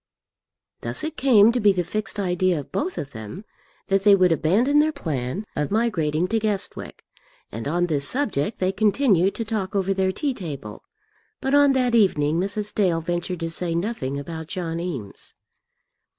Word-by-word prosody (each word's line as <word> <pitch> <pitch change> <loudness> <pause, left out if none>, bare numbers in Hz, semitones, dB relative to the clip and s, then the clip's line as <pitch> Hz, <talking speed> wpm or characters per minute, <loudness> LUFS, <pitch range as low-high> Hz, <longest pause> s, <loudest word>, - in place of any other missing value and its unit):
Thus - - -3
it 315 0 -3
came 230 -5 +5
to 245 - 0
be 210 -3 +5
the 180 -2 0
fixed 205 +3 -3
idea 180 -2 +1
of 140 - -10
both 360 +5 -2
of 145 - -5
them 110 - -8 0.4
that 195 0 +1
they 205 -1 +7
would 185 -2 +3
abandon 220 - +3
their 310 +1 +3
plan 155 - -4
of 150 -1 -1
migrating 180 -8 0
to 225 - +1
Guestwick, 205 -3 -3 0.5
and 115 +4 -5
on 175 +4 +1
this 145 -4 0
subject 220 - 0
they 185 0 +1
continued 205 -2 +2
to 230 - -3
talk 205 -3 -3
over 195 0 +1
their 190 0 +1
tea 280 +8 -2
table; 145 - -7 0.6
but 270 - -2
on 285 -1 +5
that 250 -2 +1
evening 165 -8 +3
Mrs. 205 +2 -2
Dale 180 -5 +2
ventured 175 +1 -3
to 165 0 -3
say 170 0 -2
nothing 170 - -2
about 160 +2 -6
John 165 -1 -3
Eames. 140 - -5
190 Hz, 175 wpm, -23 LUFS, 165-215 Hz, 0.6 s, they